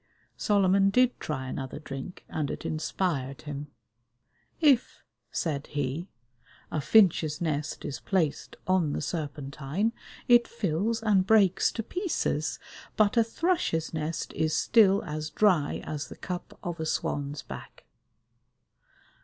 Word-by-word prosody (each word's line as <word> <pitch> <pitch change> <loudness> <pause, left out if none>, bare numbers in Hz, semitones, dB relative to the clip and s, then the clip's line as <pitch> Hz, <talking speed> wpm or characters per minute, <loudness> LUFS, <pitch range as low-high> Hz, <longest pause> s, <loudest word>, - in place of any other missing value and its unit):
Solomon 195 -1 +3
did 250 +4 +3
try 130 -4 -4
another 130 0 -5
drink, 140 +3 -8
and 150 -3 -2
it - - -5
inspired 155 -4 -2
him. 145 -1 -5 0.9
"If," 285 -7 +3 0.3
said 145 -4 -2
he, 145 +4 -3 0.6
"a 155 - -1
finch's 165 -4 +4
nest 155 -3 -2
is 140 - -4
placed 170 -7 -1
on 180 -6 +2
the - - -2
Serpentine 150 +5 -2 0.3
it 240 -1 +6
fills 220 +2 -1
and 195 -4 +3
breaks 200 -5 +4
to 225 - -3
pieces, 360 - -1 0.4
but 210 -2 +4
a 230 - +6
thrush's 225 - 0
nest 155 +1 -3
is 155 -1 0
still 205 -3 +5
as 155 0 -4
dry 175 -5 +2
as 150 0 -4
the - - -11
cup 180 -2 -6
of 175 -2 -4
a 160 - -2
swan's 145 -1 -2
back." - - -10
165 Hz, 130 wpm, -28 LUFS, 150-205 Hz, 0.9 s, it